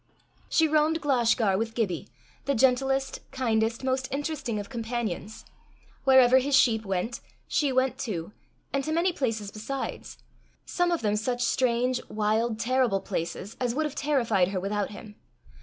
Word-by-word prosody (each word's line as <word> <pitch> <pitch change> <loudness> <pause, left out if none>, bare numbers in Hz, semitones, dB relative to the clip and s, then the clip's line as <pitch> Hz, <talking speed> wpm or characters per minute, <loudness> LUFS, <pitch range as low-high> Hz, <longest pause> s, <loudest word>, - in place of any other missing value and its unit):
She 320 - +4
roamed 310 +1 +2
Glashgar 235 -8 +2
with 225 0 -3
Gibbie, 185 - -2 0.4
the 280 0 +1
gentlest, 270 +2 +2
kindest, 230 -2 0
most 260 0 0
interesting 280 -5 -2
of 205 -1 -5
companions. 225 -3 -4 0.6
Wherever 260 -1 +7
his 275 +2 +1
sheep 225 -4 +4
went, 195 +3 -2 0.3
she 290 -3 +1
went 260 0 +1
too, 185 -7 -4 0.4
and 275 0 0
to 310 - -3
many 345 +3 +2
places 225 -8 -2
besides 245 +6 -5 0.5
some 355 0 0
of 340 - 0
them 210 -1 +2
such 245 +3 -1
strange, 250 0 +1
wild, 220 +1 0
terrible 245 -4 +2
places, 185 +3 -4
as 245 -2 -1
would 310 +2 0
have 300 - -3
terrified 240 -11 +1
her 190 0 -2
without 200 +2 -2
him. 210 0 -11
240 Hz, 150 wpm, -27 LUFS, 215-270 Hz, 0.6 s, Wherever